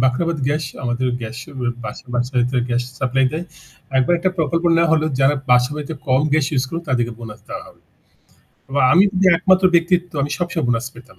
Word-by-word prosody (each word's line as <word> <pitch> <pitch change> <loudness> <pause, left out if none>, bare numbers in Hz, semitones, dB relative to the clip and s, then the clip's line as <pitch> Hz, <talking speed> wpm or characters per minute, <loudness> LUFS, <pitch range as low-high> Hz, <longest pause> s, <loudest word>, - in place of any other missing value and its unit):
Bakhrabad 155 +6 +1
gas 150 +1 -1 0.2
আমাদের 125 +1 -1
gas 115 +1 -6 0.2
ব্যা 120 -3 -3 0.2
বাসায় 125 0 +1 0.2
গ্যাস 120 0 0 0.2
সাপ্লাই 130 +1 +2
দেয়। 160 +3 -3 0.5
একবার 130 +7 +3
একটা 185 +2 +1
প্রকল্প 165 +1 0
নেওয়া 165 -1 +3
হলো, 155 -1 +2
যারা 135 +2 +4 0.2
বাসাবাড়িতে 145 +5 +1
কম 130 +1 +4
গ্যাস 155 -2 +3
ইউজ 130 -2 +1
করে, 165 +5 -4
তাদেরকে 120 -2 0
বোনাস 115 -2 -9
দেওয়া - - -6
হবে। - - -18 0.9
বা 140 - +2
আমি 180 +4 +6
যদি 190 +1 +2
একমাত্র 185 +2 +3
ব্যক্তিত্ব 175 +1 +2
আমি 145 - -2
সব 175 - 0
সময় 160 -6 -1
বোনাস 120 0 0
পেতাম। 125 +2 -16
135 Hz, 180 wpm, -20 LUFS, 125-165 Hz, 0.9 s, আমি